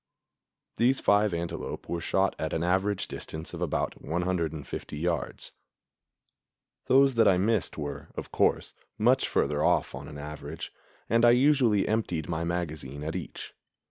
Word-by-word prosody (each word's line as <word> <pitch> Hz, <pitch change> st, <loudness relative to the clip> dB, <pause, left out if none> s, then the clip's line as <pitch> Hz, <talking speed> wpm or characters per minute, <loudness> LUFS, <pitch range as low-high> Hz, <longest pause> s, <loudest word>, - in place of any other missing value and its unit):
These 130 Hz, +3 st, +3 dB
five 105 Hz, 0 st, +3 dB
antelope 85 Hz, 0 st, -4 dB
were 85 Hz, -1 st, -3 dB
shot 95 Hz, +2 st, +1 dB
at 80 Hz, -, -2 dB
an 80 Hz, -, 0 dB
average 95 Hz, +3 st, +1 dB
distance 80 Hz, +2 st, -6 dB
of 85 Hz, -, -6 dB
about 85 Hz, -4 st, -1 dB
150 80 Hz, -4 st, -3 dB
yards. 85 Hz, +1 st, -3 dB, 1.3 s
Those 135 Hz, 0 st, +5 dB
that 115 Hz, -1 st, +4 dB
I 95 Hz, -, +5 dB
missed 105 Hz, +1 st, 0 dB
were, 75 Hz, -2 st, -5 dB
of -, -, -6 dB
course, -, -, +1 dB, 0.2 s
much 125 Hz, +5 st, +3 dB
further 75 Hz, +1 st, +1 dB
off -, -, +2 dB
on 70 Hz, +3 st, -7 dB
an 75 Hz, -, -9 dB
average, 75 Hz, +1 st, -7 dB, 0.3 s
and 115 Hz, +2 st, +3 dB
I 120 Hz, -, +8 dB
usually 125 Hz, -5 st, +4 dB
emptied 90 Hz, -8 st, -1 dB
my 85 Hz, -1 st, -2 dB
magazine 80 Hz, -5 st, -4 dB
at 80 Hz, +2 st, -3 dB
each. 90 Hz, -, -6 dB
85 Hz, 145 wpm, -28 LUFS, 80-105 Hz, 1.3 s, I